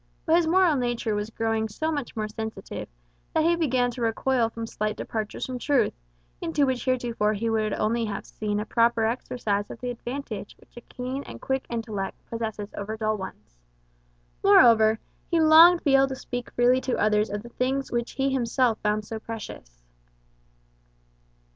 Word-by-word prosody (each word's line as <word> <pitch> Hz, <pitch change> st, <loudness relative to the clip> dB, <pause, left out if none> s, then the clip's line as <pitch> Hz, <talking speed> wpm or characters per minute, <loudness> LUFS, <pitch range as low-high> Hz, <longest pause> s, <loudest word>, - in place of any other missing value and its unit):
But 320 Hz, -, +4 dB
his 340 Hz, -1 st, +3 dB
moral 355 Hz, -2 st, +4 dB
nature 240 Hz, -3 st, -1 dB
was 210 Hz, +1 st, -2 dB
growing 225 Hz, -1 st, -1 dB
so 315 Hz, +9 st, -2 dB
much 285 Hz, -6 st, -4 dB
more 215 Hz, -1 st, -2 dB
sensitive, 220 Hz, +1 st, -6 dB, 0.5 s
that 315 Hz, -, +4 dB
he 340 Hz, +1 st, +4 dB
began 255 Hz, -7 st, +1 dB
to 245 Hz, -, -8 dB
recoil 230 Hz, +1 st, +1 dB
from 230 Hz, 0 st, -6 dB
slight 215 Hz, -1 st, -3 dB
departures 215 Hz, -2 st, -4 dB
from 255 Hz, -1 st, -5 dB
truth, 275 Hz, +1 st, +2 dB, 0.5 s
in -, -, -3 dB, 0.2 s
which 260 Hz, -2 st, -1 dB
heretofore 240 Hz, -4 st, +1 dB
he 225 Hz, +2 st, -1 dB
would 215 Hz, -1 st, 0 dB
only 230 Hz, +2 st, 0 dB
have 205 Hz, -2 st, -5 dB
seen 210 Hz, -1 st, -3 dB
a 210 Hz, -, -3 dB
proper 230 Hz, 0 st, +2 dB
exercise 220 Hz, -3 st, -2 dB
of -, -, -8 dB
the 250 Hz, 0 st, -3 dB
advantage 240 Hz, -3 st, -6 dB
which -, -, -24 dB
a 240 Hz, -, -9 dB
keen 255 Hz, +3 st, -5 dB
and -, -, -9 dB
quick 265 Hz, 0 st, -2 dB
intellect 220 Hz, -4 st, -4 dB
possesses 220 Hz, -3 st, -4 dB
over 215 Hz, +2 st, -4 dB
dull 215 Hz, 0 st, 0 dB
ones. 105 Hz, -, -9 dB, 0.8 s
Moreover, 220 Hz, -2 st, +6 dB, 0.3 s
he 335 Hz, -, +2 dB
longed 325 Hz, +2 st, +8 dB
to -, -, -33 dB
be 280 Hz, -, +4 dB
able 270 Hz, 0 st, +5 dB
to 265 Hz, -, -4 dB
speak 245 Hz, -2 st, -6 dB
freely 250 Hz, +1 st, +3 dB
to 260 Hz, -, -1 dB
others 210 Hz, 0 st, +2 dB
of 205 Hz, +1 st, -4 dB
the 240 Hz, -, -10 dB
things 265 Hz, +3 st, -1 dB
which 235 Hz, 0 st, -2 dB
he 270 Hz, 0 st, 0 dB
himself 245 Hz, -2 st, +1 dB
found 210 Hz, 0 st, 0 dB
so 220 Hz, +1 st, -5 dB
precious. 65 Hz, -, -9 dB
230 Hz, 180 wpm, -26 LUFS, 215-260 Hz, 0.8 s, longed